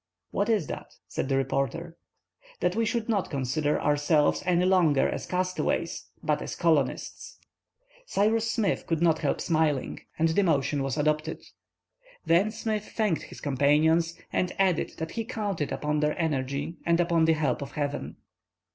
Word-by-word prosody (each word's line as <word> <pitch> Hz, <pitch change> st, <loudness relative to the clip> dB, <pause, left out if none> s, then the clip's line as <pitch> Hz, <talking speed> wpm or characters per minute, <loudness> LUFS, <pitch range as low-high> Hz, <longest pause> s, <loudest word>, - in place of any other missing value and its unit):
"What 200 Hz, +3 st, 0 dB
Is 210 Hz, -8 st, +2 dB
that?" -, -, -8 dB
said 135 Hz, -, -3 dB
the 135 Hz, -, +2 dB
reporter. 135 Hz, +5 st, -2 dB, 0.6 s
"That 180 Hz, -, +1 dB
we 225 Hz, 0 st, +1 dB
should 230 Hz, -1 st, -1 dB
not 210 Hz, -5 st, 0 dB
consider 145 Hz, +1 st, 0 dB
ourselves 145 Hz, +1 st, +2 dB
any 180 Hz, 0 st, +3 dB
longer 175 Hz, -7 st, +4 dB
as -, -, -4 dB
castaways, 185 Hz, 0 st, -1 dB, 0.2 s
but -, -, +1 dB
as -, -, -5 dB
colonists." -, -, 0 dB, 0.7 s
Cyrus 225 Hz, -, +2 dB
Smith 220 Hz, -3 st, 0 dB
could 165 Hz, -2 st, 0 dB
not 160 Hz, -2 st, +3 dB
help 145 Hz, -4 st, 0 dB
smiling, 155 Hz, -5 st, 0 dB, 0.2 s
and 165 Hz, +1 st, +3 dB
the 165 Hz, +5 st, +2 dB
motion 145 Hz, -5 st, +1 dB
was 135 Hz, +1 st, -2 dB
adopted. 155 Hz, +1 st, 0 dB, 0.8 s
Then 175 Hz, +6 st, +4 dB
Smith 215 Hz, -1 st, -3 dB
thanked 210 Hz, -8 st, +1 dB
his -, -, -11 dB
companions, 150 Hz, +4 st, +2 dB, 0.2 s
and 180 Hz, -, 0 dB
added 190 Hz, -4 st, +1 dB
that 160 Hz, 0 st, -4 dB
he 230 Hz, -, -3 dB
counted 205 Hz, -, -3 dB
upon 150 Hz, 0 st, -1 dB
their 150 Hz, 0 st, 0 dB
energy 145 Hz, 0 st, -2 dB
and 170 Hz, 0 st, +2 dB
upon 170 Hz, -2 st, +3 dB
the 160 Hz, -, +4 dB
help 150 Hz, -4 st, 0 dB
of 140 Hz, -1 st, -6 dB
Heaven. 145 Hz, -1 st, -3 dB
160 Hz, 155 wpm, -27 LUFS, 145-185 Hz, 0.8 s, longer